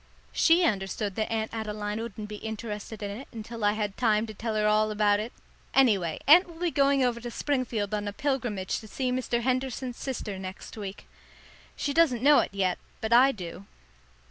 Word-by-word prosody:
She 340 +2 +5
understood 200 - 0
that 215 +3 -2
Aunt 220 0 -2
Adeline 210 -1 -3
wouldn't 215 -2 -6
be 210 0 -7
interested 220 -1 -6
in 200 - -3
it 235 +7 -8
until 230 0 -7
I 205 0 +4
had 210 -2 -2
time 220 -3 +2
to 215 - -8
tell 220 +1 -3
her 210 0 +1
all 215 0 +3
about 210 -1 +3
it. 220 +3 -4 0.4
Anyway, 200 -11 +3
Aunt 345 +7 +8
will 335 -1 -13
be 350 -1 0
going 275 -2 +3
over 240 -2 +1
to 240 - -5
Springfield 235 -6 -1
on 205 -1 -1
a - - -2
pilgrimage 240 -6 -2
to 220 - -12
see 255 +4 -2
Mr. 250 -1 0
Henderson's 255 0 -1
sister 215 -7 -4
next 190 0 -8
week. 200 -2 -7 0.7
She 285 - -2
doesn't 280 -8 +3
know 290 +1 +7
it - - 0
yet; 190 -2 0 0.2
but 220 +1 0
I 260 +3 +7
do. 190 -3 -8
220 Hz, 195 wpm, -28 LUFS, 210-255 Hz, 0.7 s, Aunt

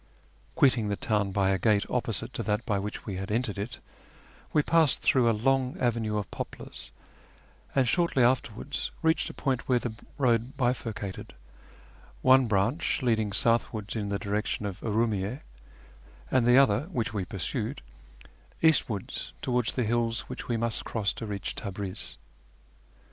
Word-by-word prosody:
Quitting 125 -6 +4
the 100 - 0
town 105 -2 0
by 95 0 +2
a 95 - +1
gate 105 +1 +3
opposite - - -2
to - - -3
that 105 +3 -1
by 105 -4 +1
which 105 +2 -5
we 95 -3 -4
had 95 +3 -5
entered 105 -2 -1
it, 105 +3 -5 0.7
we 150 - +3
passed 160 -3 +3
through 125 -3 +4
a - - +5
long 130 +3 +1
avenue 115 -3 0
of 100 -3 -4
poplars, - - -7 0.8
and 135 -2 +4
shortly 170 -2 +2
afterwards 125 +2 0
reached 160 0 +2
a - - -8
point 130 -3 -1
where 125 - +5
the 120 -2 -3 0.2
road 125 +1 +1
bifur 125 -2 0
cated, 100 -3 -6 0.9
one 130 -1 +6
branch 110 - +1
running 110 -4 +2
southwards 115 -1 0
in 105 -2 -2
tlie 100 0 -1
direction 105 +1 -2
of 100 -2 -4
Urumiyy6, 110 +1 0 0.9
and 125 -2 +3
the 120 +1 +7
other, 135 -1 +4
which 120 -6 -1
we 100 -3 -1
pursued, 90 -3 -3 0.8
eastwards 135 - +1
towards 125 -3 +1
the 125 - 0
hills 115 0 +1
which - - -8
we 120 - 0
must 115 0 -1
cross 105 -3 -1
to 110 - -6
reach 100 -2 -3
Tabriz. 100 -2 -5
115 Hz, 155 wpm, -28 LUFS, 105-125 Hz, 0.9 s, the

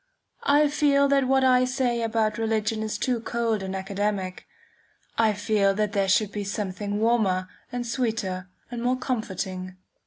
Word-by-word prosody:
I 295 +1 +5
feel 285 -1 +3
that 275 -2 +3
what 265 0 +3
I 255 -1 +5
say 250 -2 0
about 225 -1 0
religion 220 0 0
is 215 -1 -2
too 245 +1 0
cold 230 -2 -1
and 190 0 -4
academic. 195 -1 -3 0.7
I 220 -2 +3
feel 205 -1 +1
that 210 0 0
there 195 -1 +1
should 205 +2 +3
be 205 - -3
something 200 0 -3
warmer 210 -5 +2 0.2
and 245 -1 -3
sweeter 220 -7 -2 0.2
and 240 -1 -4
more 250 +2 +1
comforting. 190 -7 -4
220 Hz, 155 wpm, -26 LUFS, 200-245 Hz, 0.7 s, I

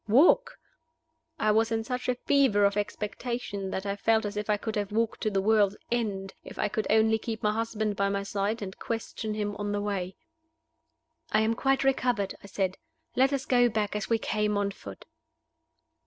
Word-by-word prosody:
Walk? 290 - +5 0.8
I 215 - +2
was 225 +2 +2
in 225 0 0
such 250 +2 -3
a 250 - +2
fever 250 -6 +3
of 200 0 +2
expectation 210 0 -3
that 190 +1 -3
I 200 0 -1
felt 220 +2 +2
as 205 0 -4
if 210 0 -3
I 210 - +3
could 220 +1 -4
have 205 -1 -2
walked 225 +1 0
to 215 - +1
the 195 -2 0
world's 210 -1 +3
end, 200 -5 -1
if - - -11
I - - 0
could 215 +1 -2
only 220 +1 +4
keep 220 0 -5
my 210 - +3
husband 215 -1 -1
by 200 0 +1
my 200 0 -1
side, 205 +2 -2
and 190 -1 -6
question 225 -1 -4
him 205 -1 -2
on 205 0 -2
the 205 - 0
way. 195 -3 -3 1.2
"I 215 - +4
am 220 +1 +2
quite 270 +3 +1
recovered," 245 -7 +1
I - - -10
said. 190 -1 -2 0.4
"Let 265 +2 +4
us 275 -1 -1
go 245 -1 +4
back, 210 -2 -1
as 210 - -3
we 230 - +3
came, 210 -1 0
on 200 0 0
foot." 100 - -11
215 Hz, 200 wpm, -28 LUFS, 200-230 Hz, 1.2 s, Walk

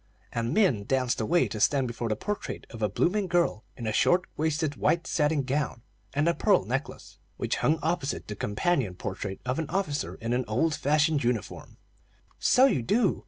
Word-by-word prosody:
And 115 0 -1
Min 155 - +2
danced 125 -2 0
away 170 +11 +2
to 110 - -5
stand 135 +4 +3
before 120 0 -4
the 110 - +1
portrait 205 - -4
of 115 - -9
a 105 - +2
blooming 190 - +1
girl 170 -11 +1
in 120 - -6
a 110 - -1
short 180 +10 +3
waisted, 155 -1 0
white 170 0 +1
satin 150 -2 +1
gown 130 -3 -2 0.3
and 145 +3 +2
a 170 - +4
pearl 200 +2 +3
necklace, 135 +4 -5 0.2
which - - -1
hung 155 - +2
opposite 160 -3 -1
the 105 - -5
companion 105 - 0
portrait 95 +1 -5
of 130 +4 -1
an 160 - -3
officer 155 -7 -2
in 115 +1 -3
an 125 +1 +1
old 140 +9 +1
fashioned 150 0 +2
uniform. 120 -3 -3 0.6
"So 255 - +5
you 255 - +2
do. 200 - +2
140 Hz, 185 wpm, -28 LUFS, 115-170 Hz, 0.6 s, So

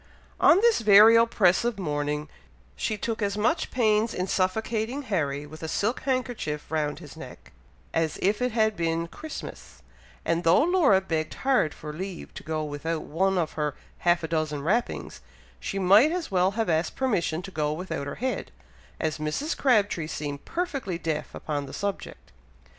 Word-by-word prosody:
On 360 - +6
this 470 -1 +4
very 215 +1 +8
oppressive 230 -1 +3
morning 150 -3 -2 0.5
she 215 - -2
took 225 +2 -3
as 200 0 -1
much 240 +11 +1
pains 220 -2 +2
in 180 - -1
suffocating 220 +8 -1
Harry 150 - -1
with 155 +2 -12
a 160 - -4
silk 210 +9 0
handkerchief 245 - -3
round 150 -2 -1
his 150 -3 -11
neck, - - -11 0.4
as 165 -2 0
if 205 +5 +1
it 250 0 +1
had 220 -1 +2
been 165 -1 -1
Christmas, 310 - -9 0.4
and 170 +1 0
though 165 +11 +5
Laura 320 - +4
begged 160 -4 -2
hard 260 - +3
for 150 -1 -7
leave 185 +2 -7
to - - -8
go 155 -1 -3
without 155 +2 -3
one 190 +5 0
of 165 -3 0
her 150 -2 -2 0.2
half 175 -1 +2
a - - -1
dozen 155 -3 -1
wrappings, 215 +10 -1 0.4
she 195 - -4
might 200 - +6
as 355 - -3
well 185 0 +3
have 225 - +1
asked 165 0 0
permission 180 -10 0
to 195 - -8
go 150 -3 -1
without 160 -3 -4
her 140 - -5
head, 260 +2 -3 0.5
as 155 -1 -2
Mrs. 155 - -2
Crabtree 205 - +2
seemed 145 -2 -5
perfectly 275 - -3
deaf 160 -2 -3
upon 145 -2 -3
the 135 - -10
subject. 200 -1 -5
185 Hz, 170 wpm, -26 LUFS, 155-225 Hz, 0.5 s, very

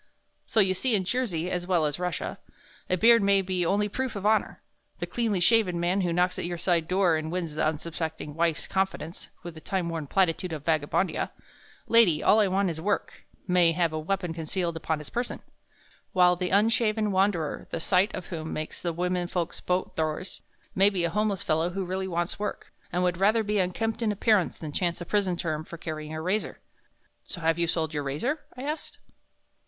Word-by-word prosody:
So 220 - +3
you 190 -1 +3
see 230 +5 +1
in 195 - +1
Jersey, 185 -6 -1
as 180 0 -2
well 175 -4 +2
as 150 -1 -1
in - - -7
Russia, 180 -2 -3 0.5
a 185 - +2
beard 230 +4 +6
may 200 -1 +4
be 185 -1 0
only 205 +4 +2
proof 260 +3 -3
of 200 0 -5
honor.... 215 +1 +2 0.4
The - - -3
cleanly 225 -5 -1
shaven 185 -2 +3
man 180 +3 +1
who 175 -2 0
knocks 180 +2 +1
at - - -3
your 175 0 -3
side 170 -2 +1
door 180 -3 +3
and 155 0 -4
wins 170 -3 -3
the 155 - -1
unsuspecting 160 -1 -4
wife's 165 0 0
confidence 190 -4 -3
with 175 -1 -7
that 160 - -13
time 185 -3 -1
worn 160 -3 -4
platitude 180 0 +1
of 150 -2 -6
Vagabondia, 160 +3 +1 0.6
'Lady, 215 -10 +5
all 215 - +5
I 210 - +4
want 190 -1 +1
is 160 -1 -6
work,' 200 +3 -2 0.2
may 180 -2 +4
have 170 -1 +1
a 155 - -1
weapon 180 +1 -2
concealed 170 +1 -2
upon 160 -1 -1
his 150 - -10
person, 240 +1 -3 0.7
while 180 -1 +5
the 180 0 -2
unshaven 215 +1 +2
wanderer, 190 -5 0
the - - -3
sight 185 +4 +2
of 185 - -6
whom 160 -3 -5
makes 155 0 -5
the 170 -1 -2
women 180 +1 -1
folks 175 -2 -3
bolt 180 +1 -1
doors, 160 +3 -3 0.3
may 195 +1 +5
be 190 -4 -1
a 170 - +1
homeless 205 0 0
fellow 160 +2 +1
who 190 +1 -3
really 190 +1 -2
wants 175 0 -2
work, 210 - -5 0.2
and 180 +1 0
would 180 -1 +1
rather 215 +3 +4
be 210 0 0
unkempt 225 +5 -1
in 220 -2 +2
appearance 210 -2 +2
than 155 -2 -6
chance 170 +2 -1
a 175 - -6
prison 190 -2 +1
term 155 -2 -2
for 170 - -9
carrying 155 -2 -6
a 155 - -4
razor." 185 +6 -1 0.7
"So 175 - -8
you - - -6 0.2
have 170 - +1
sold 160 -2 -1
your 145 - -1
razor?" 150 - -2 0.2
I 255 - -6
asked. 300 +2 -4
180 Hz, 205 wpm, -27 LUFS, 165-200 Hz, 0.7 s, beard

